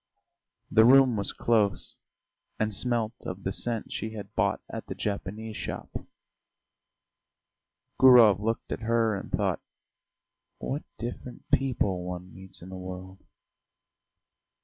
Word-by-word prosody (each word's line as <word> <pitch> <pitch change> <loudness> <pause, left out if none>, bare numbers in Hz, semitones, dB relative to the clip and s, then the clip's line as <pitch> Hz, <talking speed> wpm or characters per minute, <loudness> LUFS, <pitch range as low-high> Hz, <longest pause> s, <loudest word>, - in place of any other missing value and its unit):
The 110 - +6
room 130 0 +7
was 100 -2 0
close 105 -6 +1 0.6
and 110 0 0
smelt 115 +1 +1
of 90 +1 -6
the 95 - -1
scent 115 +2 -2
she 110 0 -4
had 100 -1 -8
bought - - +1
at - - -7
the - - -5
Japanese 105 +2 -4
shop. - - -6 2.1
Gurov 120 -7 +8
looked 115 +2 -2
at - - -2
her 115 -1 +1
and 100 - -7
thought: - - 0 1.0
"What 145 +3 -3 0.2
different 120 +1 -7
people 105 -9 +1
one 90 0 -7
meets 95 -2 -6
in 90 - -10
the 95 - -7
world!" 95 +1 -8
110 Hz, 125 wpm, -28 LUFS, 95-115 Hz, 2.1 s, Gurov